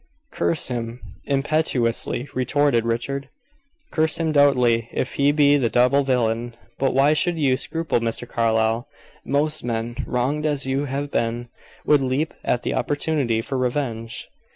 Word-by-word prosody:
"Curse 85 +7 0
him!" 120 -1 -4 0.3
impetuously 140 -4 0
retorted 130 -2 +1
Richard. 135 +4 -2 0.6
"Curse 160 0 +2
him 165 -2 0
doubly 125 -6 +3
if 125 - -3
he 140 +1 +3
be 145 -1 +4
the 125 -5 +1
double 125 +5 +3
villain. 120 -3 0 0.2
But 135 -1 +1
why 140 +3 +5
should 175 +2 +1
you 135 -4 +2
scruple 160 0 -1
Mr. 115 +1 -3
Carlyle? 115 0 +1 0.4
Most 150 +3 0
men, 115 0 -3
wronged 140 +5 0
as 145 -3 +1
you 135 +2 -1
have 140 +1 -3
been, 120 +1 -1 0.4
would 150 -2 +4
leap 135 +4 -1
at 125 - 0
the - - -1
opportunity 145 -6 0
for 135 +1 -3
revenge." 120 -3 -3
130 Hz, 145 wpm, -22 LUFS, 115-145 Hz, 0.6 s, why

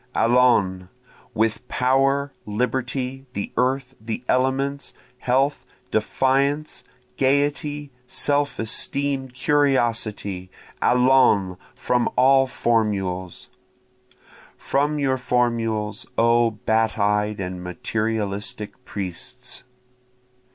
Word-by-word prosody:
Allons! 115 -7 +3 0.5
with 110 +3 0
power, 135 +3 +1
liberty, 130 +4 -2
the 100 - -4
earth, 130 +1 0
the 115 +2 -5
elements, 135 +2 0 0.2
Health, 135 +3 +1 0.3
defiance, 135 +6 0 0.3
gayety, 145 +1 0 0.2
self 145 +2 +1
esteem, 135 +4 -1
curiosity; 120 -8 0 0.3
Allons! 125 -7 +4 0.2
from 125 -1 +1
all 135 +1 +5
formules! 100 -7 -1 1.1
From 145 +2 0
your 135 -2 0
formules, 115 -4 -1
O 115 0 +4
bat 110 +1 0
eyed 105 0 +1
and 90 -1 -5
materialistic 105 +2 -3
priests. 115 +7 -7
125 Hz, 80 wpm, -23 LUFS, 105-135 Hz, 1.1 s, all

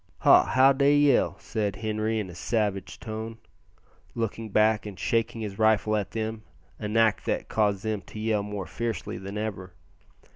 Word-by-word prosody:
"Ha! - - +7
how 135 +1 +5
dey 140 +2 +4
yell," 145 -3 +3
said 105 -3 -3
Henri 110 0 -1
in 105 - -3
a - - -11
savage 100 0 -2
tone, 110 0 -6 0.8
looking 115 -1 -3
back, 110 +1 +2
and 100 -3 -8
shaking 115 0 0
his 105 -2 -6
rifle 110 0 +3
at 105 -3 -1
them, 110 0 -4 0.4
an 105 +1 -2
act 110 -2 +3
that - - -1
caused 100 -3 +1
them 110 -2 -2
to 105 - -10
yell 110 -1 +1
more 100 -2 -5
fiercely 115 0 -4
than 100 +1 -6
ever. 95 -4 -5
110 Hz, 170 wpm, -27 LUFS, 105-115 Hz, 0.8 s, Ha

